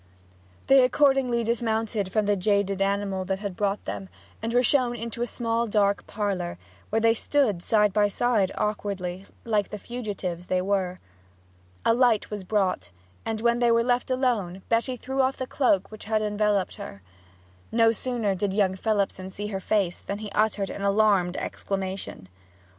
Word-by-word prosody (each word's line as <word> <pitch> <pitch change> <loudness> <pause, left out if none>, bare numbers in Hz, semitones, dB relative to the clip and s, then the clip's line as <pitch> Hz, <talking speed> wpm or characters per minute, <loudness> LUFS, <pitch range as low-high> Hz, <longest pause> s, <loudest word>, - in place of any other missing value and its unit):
They 270 -1 +6
accordingly 255 -2 +3
dismounted 225 -3 -1
from 215 0 +1
the 205 0 +2
jaded 200 0 +1
animal 195 -1 0
that 190 +1 -1
had 200 -2 -5
brought 200 +1 -1
them, 95 -1 -5 0.3
and 225 +1 -2
were 245 +1 +3
shown 250 -2 +2
into 235 0 -5
a 240 - 0
small 230 0 -1
dark 200 -1 +1
parlour, 195 -5 -2 0.3
where 220 - +1
they 225 0 +4
stood 230 -6 +1
side 210 0 +3
by 210 0 +4
side 205 -2 +1
awkwardly, 195 -3 -3 0.2
like 210 -3 +1
the 210 - -5
fugitives 200 -7 -5
they 185 - +1
were. 185 -1 -1 0.9
A - - +5
light 235 -4 +2
was 205 -2 -4
brought, 185 - 0 0.4
and 220 -1 -2
when 235 0 +2
they 240 -1 +3
were 230 0 +4
left 245 +1 0
alone 230 -8 0
Betty 235 +2 +1
threw 265 +3 -1
off 265 +1 +1
the 260 - -3
cloak 210 -8 +1
which 215 - -9
had 215 0 +1
enveloped 210 -2 0
her. 100 -1 -9 0.7
No 225 0 +4
sooner 230 -3 -1
did 190 +1 -1
young 195 -2 +2
Phelipson 195 -2 -1
see 205 +2 -5
her 195 -2 -3
face 190 -2 0
than 200 - -5
he 210 -1 -7
uttered 210 -1 +1
an - - -6
alarmed 200 -3 +3
exclamation. 190 - -4
210 Hz, 170 wpm, -26 LUFS, 195-230 Hz, 0.9 s, They